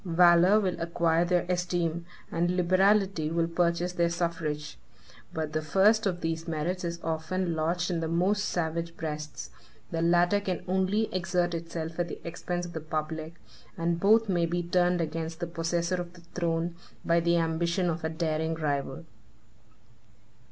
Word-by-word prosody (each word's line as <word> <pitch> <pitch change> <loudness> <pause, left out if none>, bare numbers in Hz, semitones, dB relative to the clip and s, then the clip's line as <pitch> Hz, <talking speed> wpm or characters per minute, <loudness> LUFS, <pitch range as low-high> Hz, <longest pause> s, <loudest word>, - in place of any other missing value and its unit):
Valor 175 +3 +6
will 185 -4 -1
acquire 170 0 +2
their 175 0 +1
esteem, 175 -2 -1 0.2
and 175 +2 0
liberality 185 -2 +3
will 165 0 +1
purchase 170 +1 0
their 170 -1 +2
suffrage; 165 -3 -3 0.5
but 155 -1 -3
the 155 - 0
first 205 +7 +3
of 175 -2 -2
these 165 0 -2
merits 170 +3 -2
is 170 0 -3
often 165 +2 -1
lodged 170 +3 0
in 170 - 0
the 165 - -2
most 190 +5 +1
savage 170 -1 -2
breasts; 150 -1 -5 0.4
the 165 - -1
latter 175 +4 +4
can 185 -4 -3
only 190 +4 +1
exert 175 -1 0
itself 165 0 -5
at 175 - +1
the - - -7
expense 175 +1 -3
of 170 - -9
the 160 - -4
public; 155 +1 -4 0.4
and 170 0 0
both 220 +4 +5
may 175 -3 +1
be 175 +1 -1
turned 175 0 +2
against 160 0 -3
the 170 - -1
possessor 170 +1 -1
of 175 0 -8
the 170 - -15
throne, 170 -1 -1 0.3
by 170 0 +4
the 170 0 +2
ambition 170 +2 +1
of 165 -1 -2
a 160 - 0
daring 160 0 -1
rival. 145 -1 -2
170 Hz, 160 wpm, -28 LUFS, 165-180 Hz, 0.5 s, Valor